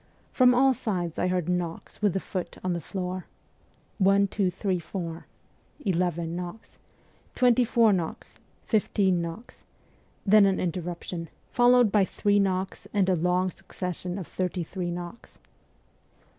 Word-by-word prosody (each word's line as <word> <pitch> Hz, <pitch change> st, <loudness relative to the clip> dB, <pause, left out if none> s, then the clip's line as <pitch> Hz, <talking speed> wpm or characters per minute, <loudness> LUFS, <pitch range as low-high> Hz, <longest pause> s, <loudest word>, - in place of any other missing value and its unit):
From 250 Hz, -1 st, +5 dB
all 265 Hz, +1 st, +5 dB
sides 180 Hz, -8 st, -3 dB
I -, -, +2 dB
heard 180 Hz, -2 st, 0 dB
knocks 175 Hz, 0 st, -3 dB
with 205 Hz, -4 st, +3 dB
the 195 Hz, -, 0 dB
foot 185 Hz, -1 st, -5 dB
on 185 Hz, -1 st, 0 dB
the 170 Hz, -, -3 dB
floor: 185 Hz, +2 st, -4 dB, 0.7 s
one, 195 Hz, +1 st, +5 dB
two, 195 Hz, -1 st, 0 dB
three, 185 Hz, 0 st, -1 dB
four,.... 170 Hz, -1 st, -6 dB, 0.6 s
eleven 170 Hz, -3 st, 0 dB
knocks; 180 Hz, +5 st, -8 dB, 0.6 s
twenty 250 Hz, -1 st, +4 dB
four 230 Hz, -2 st, +4 dB
knocks, 170 Hz, -4 st, -4 dB, 0.3 s
fifteen 195 Hz, -4 st, +2 dB
knocks; 170 Hz, +8 st, -8 dB, 0.6 s
then 205 Hz, 0 st, +7 dB
an 195 Hz, -, +1 dB
inter 180 Hz, 0 st, -1 dB
ruption, 170 Hz, 0 st, -5 dB, 0.2 s
followed 245 Hz, -2 st, +5 dB
by 205 Hz, -1 st, +4 dB
three 205 Hz, +2 st, +1 dB
knocks 190 Hz, -1 st, -1 dB
and 195 Hz, -2 st, +3 dB
a 185 Hz, -, +4 dB
long 180 Hz, +2 st, +1 dB
suc -, -, -18 dB
cession 180 Hz, 0 st, -4 dB
of 190 Hz, -, -5 dB
thirty 180 Hz, 0 st, -2 dB
three 175 Hz, +1 st, -4 dB
knocks. 175 Hz, +5 st, -7 dB
185 Hz, 145 wpm, -27 LUFS, 175-205 Hz, 0.7 s, then